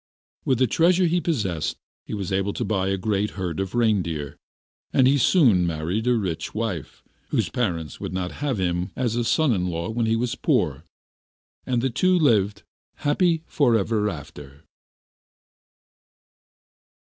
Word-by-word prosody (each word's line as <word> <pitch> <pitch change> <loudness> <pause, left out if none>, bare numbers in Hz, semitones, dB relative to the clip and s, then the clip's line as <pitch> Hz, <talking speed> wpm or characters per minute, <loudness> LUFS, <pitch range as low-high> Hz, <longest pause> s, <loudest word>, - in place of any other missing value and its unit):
With 130 - +2
the 130 - +4
treasure 175 - +3
he 175 +1 +1
possessed 105 - -1 0.3
he - - -4
was 100 -3 -4
able 100 +1 0
to - - -3
buy 95 -3 0
a 95 0 0
great 105 +1 0
herd 90 -3 -3
of 95 +3 -3
reindeer; 90 - 0 0.6
and 130 - +4
he 140 +2 +4
soon 115 - +4
married 85 +8 -2
a 125 - +4
rich 95 -5 -3
wife, 105 -9 -4 0.3
whose - - 0
parents 85 - -2
would - - -5
not 90 -1 -3
have 140 -5 0
him 90 -1 -1
as 120 -3 -1
a 120 - 0
son 150 +2 +2
in 90 -3 -1
law 85 -1 -3
when 115 0 0
he 110 - +2
was 120 +1 -1
poor, 75 +2 0 0.8
and 125 -2 0
the 135 - +1
two 185 +9 +3
lived 105 - +2 0.4
happy 165 +2 +2
for 130 -8 +2
ever 105 0 0
after. 70 -3 -10
105 Hz, 160 wpm, -24 LUFS, 90-125 Hz, 0.8 s, the